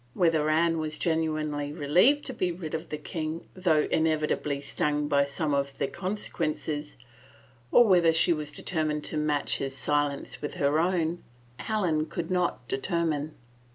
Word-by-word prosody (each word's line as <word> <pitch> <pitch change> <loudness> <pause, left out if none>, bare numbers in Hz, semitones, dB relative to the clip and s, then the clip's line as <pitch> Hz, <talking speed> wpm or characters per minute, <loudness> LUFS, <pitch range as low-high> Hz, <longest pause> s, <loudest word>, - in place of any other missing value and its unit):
Whether 160 -3 +2
Anne 165 +1 +2
was 155 -1 -3
genuinely 155 -3 -1
relieved 175 - +3
to 265 - -4
be 185 -6 0
rid 170 -2 -6
of 160 0 -4
the 150 - -3
king, 155 +1 -5
though 165 -5 +2
inevitably 155 -2 +1
stung 145 +1 -1
by 140 -1 +3
some 145 +2 -2
of 140 -1 -1
the - - 0
conse 195 +6 -4
quences, 155 -2 -3 0.8
or 240 - +7
whether 175 -5 +5
she 165 +1 +3
was 150 -2 -4
determined 155 -3 -2
to 155 - -2
match 150 -2 0
his 135 0 -4
silence 145 0 -1
with 145 - -4
her 145 +2 +2
own, 170 -1 0 0.4
Helen 175 -8 0
could 165 +2 -4
not 175 -9 0
determine. 155 0 -1
155 Hz, 155 wpm, -28 LUFS, 150-170 Hz, 0.8 s, or